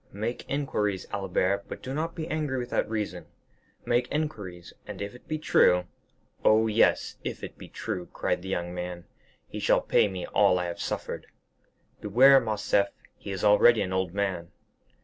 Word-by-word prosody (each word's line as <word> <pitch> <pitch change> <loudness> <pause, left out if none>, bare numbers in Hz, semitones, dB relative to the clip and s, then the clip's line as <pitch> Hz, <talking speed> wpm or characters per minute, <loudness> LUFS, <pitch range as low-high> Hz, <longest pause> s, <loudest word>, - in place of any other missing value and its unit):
"Make 110 +4 -4
inquiries, 105 -9 -1
Albert, 100 0 0
but - - -8
do 130 - -4
not 160 +3 -2
be 160 -2 -4
angry 150 -5 -2
without 120 -3 -1
reason; 110 -2 -3 0.6
make 120 +1 +1
inquiries, 105 - -4
and 105 -3 -7
if 100 0 -5
it 125 - -16
be 155 - -2
true——" 90 -11 +4 0.6
"Oh, 110 +1 +5
yes, 110 0 +2
if - - -5
it - - -7
be - - -11
true," 95 -6 -5
cried - - -1
the 95 - -7
young 90 -2 -2
man, 90 -1 -5 0.4
"he - - -6
shall - - +3
pay - - +3
me 95 -3 -5
all 95 -3 +3
I 90 - -1
have 85 -1 -5
suffered." - - -4 0.7
"Beware, 130 +6 +6
Morcerf, 105 -3 +1 0.3
he - - -10
is 95 -2 -4
already 105 +1 +6
an 95 -1 -4
old 95 -2 0
man." 95 -3 -2
105 Hz, 170 wpm, -27 LUFS, 95-120 Hz, 0.7 s, Beware